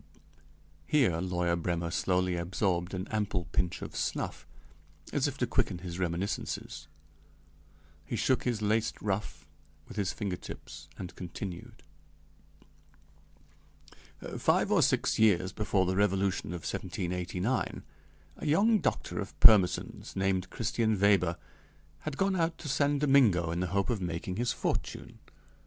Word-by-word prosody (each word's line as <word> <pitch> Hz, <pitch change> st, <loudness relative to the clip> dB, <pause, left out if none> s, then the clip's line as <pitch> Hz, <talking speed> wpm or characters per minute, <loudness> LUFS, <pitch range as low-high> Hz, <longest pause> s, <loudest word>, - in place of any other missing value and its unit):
(Here 125 Hz, -, +3 dB
lawyer 90 Hz, -1 st, 0 dB
Brêmer 85 Hz, 0 st, -2 dB
slowly 90 Hz, +1 st, +1 dB
absorbed 90 Hz, +1 st, -1 dB
an 95 Hz, +2 st, -4 dB
ample 105 Hz, -4 st, -1 dB
pinch 90 Hz, -1 st, 0 dB
of -, -, -7 dB
snuff -, -, -3 dB, 0.7 s
as -, -, +2 dB
if -, -, -4 dB
to -, -, +1 dB
quicken -, -, 0 dB
his 85 Hz, 0 st, -6 dB
reminiscences; 90 Hz, +2 st, -3 dB, 1.2 s
he 75 Hz, -, -4 dB
shook 130 Hz, +3 st, +2 dB
his 115 Hz, -4 st, -1 dB
laced 110 Hz, +1 st, +1 dB
ruff 105 Hz, 0 st, -3 dB, 0.4 s
with -, -, -11 dB
his 100 Hz, -3 st, 0 dB
finger 100 Hz, -4 st, -3 dB
tips -, -, -10 dB
and 90 Hz, -1 st, -7 dB
continued:) 90 Hz, 0 st, -7 dB, 2.6 s
Five -, -, +2 dB
or -, -, +5 dB
six -, -, +2 dB
years 95 Hz, -4 st, +4 dB
before 105 Hz, -3 st, +1 dB
the 95 Hz, +1 st, 0 dB
Revolution 95 Hz, -1 st, +1 dB
of 85 Hz, 0 st, -5 dB
1789, 90 Hz, +10 st, -2 dB, 0.5 s
a -, -, -7 dB
young 205 Hz, +9 st, +4 dB
doctor 110 Hz, -, -2 dB
of 100 Hz, -, -6 dB
Pirmesens, 105 Hz, -7 st, +5 dB
named 95 Hz, -1 st, 0 dB
Christian 110 Hz, -3 st, 0 dB
Weber, 95 Hz, -4 st, +3 dB, 0.6 s
had 155 Hz, -2 st, -5 dB
gone 195 Hz, 0 st, +2 dB
out 165 Hz, -2 st, 0 dB
to 155 Hz, -, -8 dB
San 145 Hz, +1 st, +2 dB
Domingo 125 Hz, -, +4 dB
in 85 Hz, -, -2 dB
the 90 Hz, -, 0 dB
hope 95 Hz, +1 st, 0 dB
of 110 Hz, -5 st, -1 dB
making 90 Hz, +1 st, -3 dB
his 120 Hz, +1 st, +1 dB
fortune. -, -, -3 dB
95 Hz, 135 wpm, -30 LUFS, 90-110 Hz, 2.6 s, or